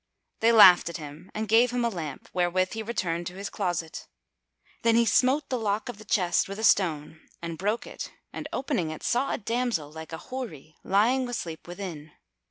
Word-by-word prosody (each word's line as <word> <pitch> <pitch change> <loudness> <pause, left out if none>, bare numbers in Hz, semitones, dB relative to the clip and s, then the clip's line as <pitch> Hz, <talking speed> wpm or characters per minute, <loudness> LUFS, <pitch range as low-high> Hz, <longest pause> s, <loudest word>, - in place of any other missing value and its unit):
They 230 +1 +4
laughed 185 -7 +8
at 170 - -5
him 155 +3 -10
and 215 +1 -2
gave 230 +4 +5
him 245 0 0
a - - +2
lamp, 160 -9 -6
wherewith 180 +1 +1
he 225 - -3
returned 175 -7 -2
to 180 - -7
his 200 +1 -6
closet. 175 -5 -3 0.7
Then 230 0 +3
he 235 0 +5
smote 265 +6 +3
the 255 -2 -1
lock 210 +1 -1
of 240 - -7
the 215 - -12
chest 185 -3 +1
with 195 - -5
a 220 - -5
stone 160 -7 +2 0.2
and 170 -1 -5
broke 205 +7 -1
it - - -7 0.2
and - - -5
opening 250 - -1
it, 155 - -7
saw 255 +3 +1
a - - 0
damsel 230 -9 -1
like 160 +1 -9
a 160 - -4
Houri 165 - -6
lying 245 +6 +2
asleep 175 -10 -5
within. 175 -5 -7
195 Hz, 195 wpm, -27 LUFS, 165-230 Hz, 0.7 s, laughed